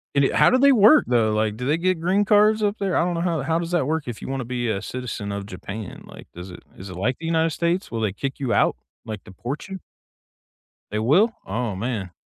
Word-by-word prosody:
And, 140 -1 +4
eh, - - -1
how - - +6
do 255 - +3
they 280 +1 +6
work, 235 +6 +6
though? 115 -3 +2
Like, 110 0 0
do 125 - -5
they 150 +4 +2
get 185 -1 0
green 190 +5 +1
cards 215 +1 +4
up 205 +1 0
there? 195 -3 -1
I - - +3
don't 175 0 -1
know 170 - -2
how 170 -5 0
how 160 +4 0
does 170 0 -4
that 175 -7 +1
work 160 0 -1
if 120 - -6
you - - -7
want 135 0 -3
to - - -6
be 120 -1 -2
a 100 -2 -1
citizen 115 -5 -5
of 100 0 -4
Japan, 100 +1 -8
like, - - -13
does 90 +2 -9
it - - -11 0.2
is 95 +1 -9
it 90 - -8
like 120 +8 -1
the 165 - -7
United 165 0 +1
States? 170 +2 -1
Will 115 -1 -3
they 105 -3 0
kick 135 +6 -5
you 130 -4 -1
out, - - +3 0.3
like 110 -3 -6
deport 120 - -7
you? 190 -1 -7 1.1
They 105 - -2
will? 185 - +3
Oh 110 0 -3
man. 100 -4 -3
135 Hz, 260 wpm, -23 LUFS, 110-175 Hz, 1.1 s, how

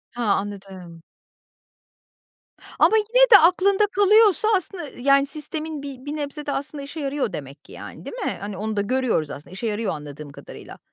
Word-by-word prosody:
Ha, 230 -4 +1
anladım. 190 -4 -9 1.8
Ama 440 - +5
yine 485 +4 +4
de 410 - +12
aklında 385 +4 +3
kalıyorsa 410 0 +4
aslında 350 -3 -3
yani 275 +2 +3
sistemin 305 0 -4
bir 270 -1 -9
bir 295 +1 -4
nebze 295 0 -5
de 285 - -2
aslında 280 0 -4
işe 305 +3 -8
yarıyor 275 -5 -2
demek 140 +1 -9
ki - - -16
yani - - -10
değil - - -7
mi? - - -2
Hani 200 -2 -6
onu 215 0 -4
da - - +2
görüyoruz 230 - 0
aslında 145 - -10
işe 225 +4 -4
yarıyor 215 0 -2
anladığım 145 0 -9
kadarıyla. - - -12
275 Hz, 170 wpm, -23 LUFS, 200-325 Hz, 1.8 s, de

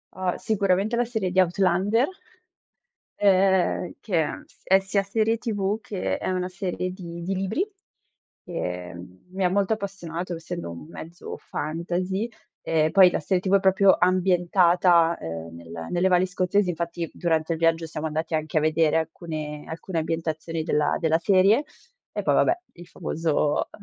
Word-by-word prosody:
Uhm, 185 -1 -1
sicuramente 200 +1 +1
la 240 - +2
serie 220 -6 -2
di 190 - +2
Outlander 190 +6 +2 1.1
ehm, 190 -2 +3
che 180 -7 0
è - - -3
s - - -28
è 190 +1 +5
sia 195 +1 0
serie 220 +3 +1
TV 210 -2 -1
che 195 -3 -3
è - - -3
una 185 -1 -1
serie 180 0 -3
di 170 -2 -8
di 190 - -2
libri, 195 - -1 0.8
ehm, 90 - -6
mi 190 0 -2
ha 180 - +4
molto 200 +3 +1
appassionato, 180 -4 -5
essendo 165 - -6
un 85 - -9
mezzo 170 +1 -8
fantasy, 180 +7 -3 0.3
e 155 -1 +1
poi 190 -2 +7
la - - -1
serie 180 +4 0
TV 195 +1 +2
è - - +5
proprio 190 0 +5
ambientata, 175 -2 +3
ehm, 80 0 -6
nel 85 -1 -8
nelle 180 +2 +2
valli 180 +1 +3
scozzesi, 185 +1 +1
infatti 170 -1 -3
durante 165 -1 0
il 160 - -5
viaggio 165 0 +2
siamo 155 0 -5
andati 160 +1 -2
anche 155 0 -2
a - - -2
vedere 155 0 +2
alcune 155 -2 -5
alcune 165 +2 -5
ambientazioni 160 0 -3
della 150 -2 +1
della 160 -1 +2
serie 200 - +4 0.5
e - - +1
poi, - - +2
vabbè, 350 +1 +3
il 175 -1 -13
famoso, 155 -2 -1
180 Hz, 160 wpm, -25 LUFS, 160-190 Hz, 1.1 s, poi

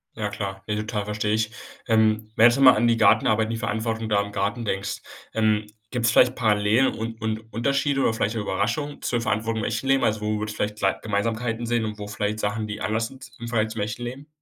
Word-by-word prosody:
Ja 105 -2 -2
klar, 100 -1 -5
ne, 105 - -1
total, 105 -1 -3
verstehe 105 0 -1
ich. 110 0 0 0.4
Ähm, 110 -1 +2
wenn 115 - +6
du - - +10
jetzt 140 - -2
mal 130 -2 +9
an 120 +2 +2
die 115 -1 +3
Gartenarbeit, 110 0 +3
die 115 - -2
Verantwortung 110 0 -2
da 100 -1 +3
im 100 - -8
Garten 105 +4 -2
denkst, 100 -1 -2 0.3
ähm, 110 -1 +1 0.2
gibt's 115 -3 +1
vielleicht 125 +1 +5
Parallelen 110 +2 +3
und 115 0 -5
und 110 0 -3
Unterschiede 140 +3 +1
oder 115 - +2
vielleicht 110 0 -1
Überraschungen 115 +8 -2
zur 120 -1 -1
Verantwortung 110 0 -1
im - - 0
echten 115 +4 -2
Leben? 135 0 +3
Also, 105 0 +1
wo 105 0 -1
würdest 110 0 -4
du - - -11
vielleicht 105 +1 -4
klei 95 -1 +2
Gemeinsamkeiten 115 +2 -1
sehen 115 -1 +1
und 105 -1 -5
wo 105 - -5
vielleicht 105 0 -2
Sachen, 105 +1 -2
die 105 0 -6
anders 110 +1 0
sind 130 -2 -13
im 120 - -6
Vergleich 110 -2 0
zum 110 - -4
echten 105 +4 -3
Leben? 130 +4 -7
110 Hz, 230 wpm, -24 LUFS, 105-115 Hz, 0.4 s, du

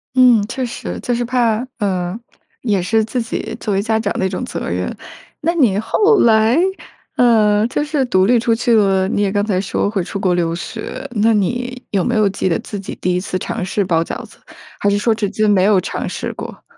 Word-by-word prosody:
嗯， 250 -4 +6
确 255 +2 -3
实。 240 - -6
就 245 - -1
是 240 0 0
怕 240 -1 +1
呃， 185 -1 -2 0.4
也 205 -6 +1
是 220 +5 +2
自 245 +3 -2
己 225 -1 -4
作 210 - -2
为 195 - +1
家 220 +1 0
长 205 -2 -1
的 190 - 0
一 - - 0
种 190 +6 -4
责 250 - -5
任。 - - -2 0.5
那 335 - +1
你 250 - +3
后 420 - +3
来 220 +2 +4 0.6
呃， 215 -3 +4
就 265 +4 -1
是 300 -2 0
独 185 -6 +3
立 240 +3 +4
出 230 0 +1
去 240 +1 +1
了 195 -3 +3
你 205 - -1
也 200 -1 +1
刚 205 0 0
才 190 -4 0
说 200 +1 -1
会 200 -3 -1
出 200 - -5
国 185 -2 +1
留 170 -1 0
学， 215 +5 -6
那 225 0 +2
你， 245 +5 -1
有 195 -3 +1
没 240 - 0
有 215 -2 +3
记 190 -1 -1
得 165 - +1
自 205 - -6
己 195 - -7
第 180 - +1
1 180 - +1
次 185 - -3
尝 220 +3 -4
试 195 +2 -1
包 165 -2 +2
饺 - - -6
子？ - - -18 0.4
还 205 - +2
是 200 - +2
说 225 +2 +2
至 215 -2 -2
今 215 +1 +1
没 195 -3 +4
有 200 -1 +4
尝 - - -4
试 - - -4
过？ - - -9
215 Hz, 245 characters per minute, -18 LUFS, 195-235 Hz, 0.6 s, 嗯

